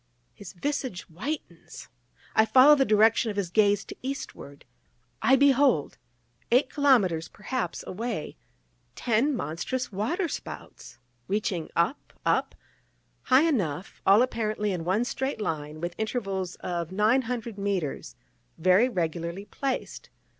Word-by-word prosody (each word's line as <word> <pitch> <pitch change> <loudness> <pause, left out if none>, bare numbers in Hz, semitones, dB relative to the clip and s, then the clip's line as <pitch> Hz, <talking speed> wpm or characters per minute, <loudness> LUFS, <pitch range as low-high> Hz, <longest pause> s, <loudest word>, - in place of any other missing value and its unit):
_" - - -43 0.3
His 200 -4 -11
visage 260 -1 -3
whitens! 190 - -7 0.5
I 220 - +6
follow 260 +6 +7
the 275 -2 +4
direction 220 +1 +4
of 205 - -5
his 185 -4 -2
gaze 205 -1 +3
to - - -9
eastward! 260 - -7 0.6
I 265 - +5
behold! 270 - +3 0.5
eight 255 +3 +3
kilomètres 205 - +2
perhaps 210 -3 -4
away, 215 -5 -4 0.6
ten 245 +5 +1
monstrous 240 +8 -3
waterspouts, 225 - -4 0.3
reaching 195 -5 -2
up, 170 +12 -1
up, - - +1 0.7
high 260 +2 +5
enough 190 - -1
all 200 +5 +6
apparently 215 -4 -1
in 175 -3 -3
one 200 +7 +1
straight 265 +1 -3
line, 155 -6 -4
with 175 +1 -4
intervals 195 -5 -2
of 170 -1 -4
nine 215 +7 +3
hundred 235 -3 -5
mètres, 185 - -3 0.4
very 185 +8 +4
regularly 170 -1 -3
placed. 270 +3 -4
210 Hz, 125 wpm, -27 LUFS, 175-255 Hz, 0.7 s, follow